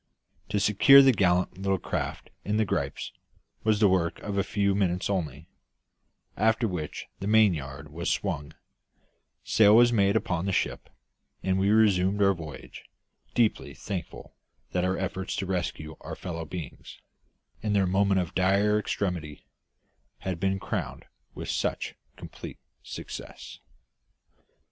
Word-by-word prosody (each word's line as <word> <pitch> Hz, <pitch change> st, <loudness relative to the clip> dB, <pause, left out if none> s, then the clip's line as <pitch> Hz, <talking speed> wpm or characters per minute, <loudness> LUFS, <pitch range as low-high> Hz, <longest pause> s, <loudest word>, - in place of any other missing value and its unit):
To 105 Hz, 0 st, 0 dB
secure 105 Hz, +7 st, +7 dB
the 135 Hz, -, +7 dB
gallant 90 Hz, -4 st, +1 dB
little 95 Hz, 0 st, +1 dB
craft -, -, -4 dB
in 105 Hz, +2 st, -1 dB
the 110 Hz, -, +2 dB
gripes -, -, -3 dB, 0.5 s
was 110 Hz, -1 st, +2 dB
the 105 Hz, -, +6 dB
work 90 Hz, -3 st, +1 dB
of 100 Hz, -1 st, -4 dB
a 100 Hz, -, +2 dB
few 100 Hz, -1 st, 0 dB
minutes 95 Hz, -1 st, 0 dB
only; 80 Hz, -5 st, -3 dB, 0.9 s
after 110 Hz, +2 st, +2 dB
which 85 Hz, -6 st, -5 dB
the 100 Hz, -, -4 dB
mainyard 75 Hz, -10 st, +2 dB
was 85 Hz, +2 st, -2 dB
swung, 80 Hz, -6 st, -2 dB, 0.9 s
sail 105 Hz, -1 st, +5 dB
was 120 Hz, +1 st, +6 dB
made 100 Hz, -2 st, +3 dB
upon 90 Hz, -4 st, 0 dB
the -, -, +1 dB
ship, -, -, -2 dB, 0.5 s
and 95 Hz, 0 st, +1 dB
we 100 Hz, +1 st, +2 dB
resumed 105 Hz, -2 st, +3 dB
our 100 Hz, 0 st, +5 dB
voyage, 80 Hz, -6 st, -10 dB, 0.5 s
deeply 115 Hz, -3 st, +1 dB
thankful 95 Hz, -4 st, -6 dB, 0.4 s
that 90 Hz, -, 0 dB
our 95 Hz, +1 st, 0 dB
efforts 95 Hz, 0 st, -3 dB
to 95 Hz, -, -2 dB
rescue 85 Hz, -4 st, -3 dB
our -, -, -6 dB
fellow 85 Hz, -2 st, -5 dB
beings, 80 Hz, -1 st, -8 dB, 0.6 s
in 105 Hz, -1 st, -1 dB
their 100 Hz, -2 st, +3 dB
moment 95 Hz, +1 st, +2 dB
of 90 Hz, 0 st, -6 dB
dire 100 Hz, +3 st, +3 dB
extremity, 90 Hz, -8 st, -3 dB, 0.8 s
had 95 Hz, -3 st, -3 dB
been 95 Hz, +1 st, 0 dB
crowned -, -, -4 dB, 0.3 s
with -, -, -6 dB
such -, -, -2 dB, 0.2 s
complete -, -, -9 dB, 0.2 s
success. -, -, -9 dB
95 Hz, 140 wpm, -27 LUFS, 90-105 Hz, 0.9 s, secure